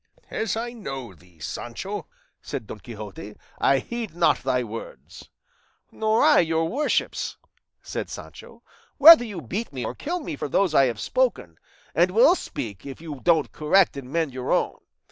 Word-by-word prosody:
"As 225 0 -1
I 235 +1 -4
know 135 - -7
thee, 90 0 -22
Sancho," 120 - -6 0.3
said - - -5
Don - - -9
Quixote, - - -9 0.2
"I - - +4
heed 235 -6 -5
not 175 -1 +3
thy 125 -1 0
words." 115 0 -9 0.6
"Nor 220 0 +1
I - - +6
your 165 -1 +1
worship's," 285 - -1 0.5
said - - -5
Sancho, - - -11 0.3
"whether 310 -2 +10
you 205 -7 -6
beat 215 +9 -4
me 130 -3 -4
or - - -3
kill 350 +4 -3
me 290 - -5
for 140 - -5
those 185 +2 +2
I 135 -2 +6
have 120 -4 -2
spoken, 230 - -1 0.3
and 175 +4 +4
will 235 - +6
speak 105 - -6
if 135 -1 -8
you 155 -4 -8
don't 165 -4 +2
correct 170 +4 +3
and 135 -2 -8
mend 160 -4 -1
your 130 0 -4
own. - - +1
165 Hz, 165 wpm, -24 LUFS, -, 0.6 s, whether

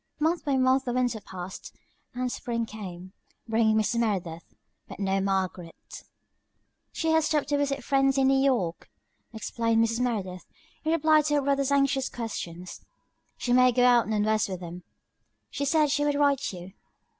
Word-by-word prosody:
'" - - -46
Month 340 0 -1
by 280 -2 +1
month 260 +1 +3
the 245 - -2
winter 245 -3 0
passed, 185 -1 -9 0.4
and 250 0 -2
spring 235 -1 -3
came, 185 -4 -9 0.3
bringing 220 -1 +2
Mrs. 220 +2 +1
Merideth, 180 -7 -3 0.3
but - - -10
no 195 -1 0
Margaret. 185 -3 -3 0.9
"She 325 0 -1
has 320 -1 +3
stopped 295 -2 0
to 290 - +2
visit 275 -2 -1
friends 270 +1 +2
in 265 -1 +3
New 270 0 +3
York," 205 -12 0 0.4
explained 230 0 0
Mrs. 230 +1 -2
Merideth, 200 -7 -3 0.4
in 315 - 0
reply 310 -1 +4
to 295 0 0
her 290 - +2
brother's 275 0 +1
anxious 275 -1 +2
questions. 180 -7 -6 0.6
"She 245 - -1
may 255 0 +6
go 245 +1 +3
on 230 -4 +3
west 215 -1 +1
with 185 -2 -5
them. 175 +1 -8 0.7
She 280 - -2
said 300 0 +2
she 290 0 +1
would 290 -1 +1
write 285 -1 +1
you." 180 0 -10
240 Hz, 165 wpm, -27 LUFS, 195-275 Hz, 0.9 s, may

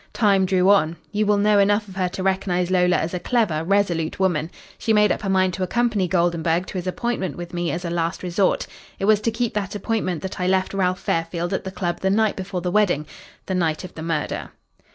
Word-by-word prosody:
Time 200 -4 +3
drew 185 0 +2
on. 195 -5 +4 0.2
You 210 0 0
will 205 0 +4
know 205 0 +4
enough 205 +1 +2
of 190 - -11
her 185 -2 0
to 185 - -5
recognise 185 -2 0
Lola 180 -1 +3
as 160 +3 -1
a 180 - -2
clever, 180 -7 0
resolute 175 -4 0
woman. 170 -5 +1 0.3
She 225 - +1
made 210 0 +4
up - - -1
her 200 - -3
mind 185 -1 +2
to 190 - -5
accompany 210 0 +1
Goldenburg 170 -1 +1
to 185 - -5
his 180 - -6
appointment 190 -4 -2
with 175 0 -7
me 175 -1 -1
as 175 +2 -3
a 170 - -3
last 170 +1 -2
resort. 185 +2 +1 0.3
It 195 - -2
was 215 0 +4
to 230 - +1
keep 230 +1 -2
that 205 -1 -3
appointment 200 -6 -2
that 190 - -5
I 180 - +1
left 190 0 +1
Ralph 185 -1 0
Fairfield 165 +2 -1
at 190 - -2
the 190 - -4
club 175 -2 -3
the 190 - 0
night 215 +1 +2
before 185 -1 -4
the 180 0 -2
wedding 180 -7 +2 0.4
the 190 - -3
night 165 -3 0
of 185 - -9
the 160 - -8
murder." 160 -2 -2
185 Hz, 235 wpm, -22 LUFS, 175-200 Hz, 0.4 s, on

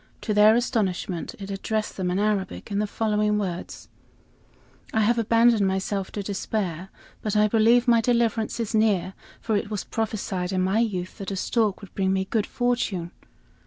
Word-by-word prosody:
To 215 - -1
their 210 +1 +6
astonishment 200 -8 -1
it 195 -1 -7
addressed 215 +2 -2
them 185 -2 -2
in 180 - 0
Arabic, 200 - -1
in 200 - 0
the 210 - 0
following 210 0 0
words: 180 -4 -5 1.0
"I 220 - +1
have 235 +3 +3
abandoned 230 -2 +4
myself 190 0 -2
to 205 - -3
despair, 190 -3 -3 0.3
but 215 -1 -2
I 210 0 +5
believe 230 +3 +4
my 235 -1 +5
deliverance 230 -1 0
is 230 -1 -2
near, 210 -4 +2 0.3
for 220 - 0
it 205 - -1
was 210 -3 -3
prophesied 200 -5 -3
in 185 - +1
my 190 +4 +2
youth 190 -4 -2
that 195 - -5
a 195 - -3
stork 215 +1 0
would 200 - -12
bring 190 -1 0
me 190 0 0
good 215 +2 -1
fortune." 225 -8 -1
210 Hz, 175 wpm, -25 LUFS, 190-225 Hz, 1.0 s, their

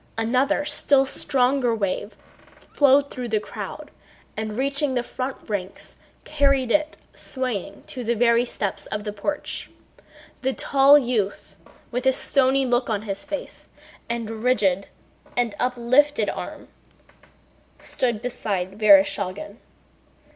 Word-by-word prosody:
Another 255 +6 +1
still 285 -2 +3
stronger 260 -2 +1
wave 205 0 -3 0.6
flowed 280 0 +4
through 250 -1 -5
the 220 -2 +1
crowd - - -8 0.4
and 215 0 -4
reaching 275 +1 0
the 245 - 0
front 255 +2 -4
ranks 195 -3 -5 0.3
carried 275 -4 +1
it 305 +3 +1 0.2
swaying 245 -7 -4
to 255 - -6
the 235 +1 0
very 235 +1 +4
steps 205 -5 -4
of 210 0 -4
the 210 -1 -4
porch. 290 +9 -4 0.7
The 265 0 0
tall 275 +2 +5
youth, 235 -7 -2 0.4
with 250 +2 -1
a 265 - +5
stony 270 0 +2
look 245 0 +1
on 210 -2 -1
his 200 +1 -4
face, 295 0 -7 0.4
and 225 -2 -4
rigid 200 -6 +2 0.5
and 240 -3 +1
uplifted 255 +4 +2
arm, - - -8 1.1
stood 240 -3 -2
beside 200 -5 -3
Vereshchágin. 200 0 +3
245 Hz, 120 wpm, -23 LUFS, 210-270 Hz, 1.1 s, tall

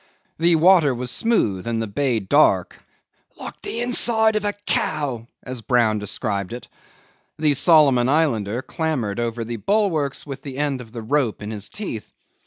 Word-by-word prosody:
The 170 +1 +4
water 165 -5 +5
was 125 0 -3
smooth, 115 - 0
and 115 -1 -1
the 115 - -1
bay 120 +2 0
dark, 95 - +2 0.6
"like - - -9
the 230 - -4
inside 230 -2 +2
of 215 - 0
a 205 - 0
cow," 135 -7 -1 0.2
as 125 -2 -6
Brown 115 -3 +2
described 100 -1 -3
it. 120 - -8 0.7
The 150 -1 +3
Solomon 140 -4 +4
Islander 125 -7 +1
clambered 130 -11 -2
over 115 0 -2
the 115 +1 -5
bulwarks 165 - 0
with 135 -2 -7
the 135 -2 -8
end 140 -3 -1
of 115 -3 -13
the 115 -1 -7
rope 120 -3 0
in 105 - -5
his 105 -1 -6
teeth. 150 - -6
130 Hz, 165 wpm, -22 LUFS, 115-160 Hz, 0.7 s, water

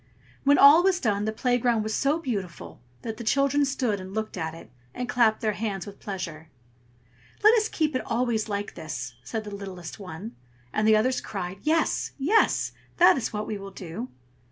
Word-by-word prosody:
When 285 +1 +6
all 290 +4 +9
was 370 0 +2
done 210 - 0
the 220 - 0
playground 240 -1 +1
was 215 0 -3
so 280 +6 +2
beautiful 200 - -5 0.2
that 225 -2 -5
the 235 - -6
children 275 +4 +2
stood 250 -7 -1
and 190 +2 -9
looked 220 0 -3
at 160 -3 -3
it, 165 - -13 0.2
and 250 - -3
clapped 230 -3 +3
their 215 -1 +1
hands 200 -4 -3
with 200 -1 -11
pleasure. 165 -5 -6 0.9
"Let 430 +2 +8
us 440 -2 +2
keep 305 -3 0
it 255 - +1
always 230 -2 -1
like 205 0 -3
this!" 130 -6 -6
said 220 - -4
the 210 -1 -8
littlest 185 -3 -8
one; 190 +4 -8 0.4
and 215 0 +1
the 220 - +6
others 250 +4 +1
cried, 190 -2 -5
"Yes! 320 +1 +1
yes! 345 +11 +2 0.3
that 350 - +7
is 255 -5 -2
what 210 0 -3
we 210 -2 -4
will 195 0 -8
do." 170 -8 -7
220 Hz, 190 wpm, -26 LUFS, 195-260 Hz, 0.9 s, all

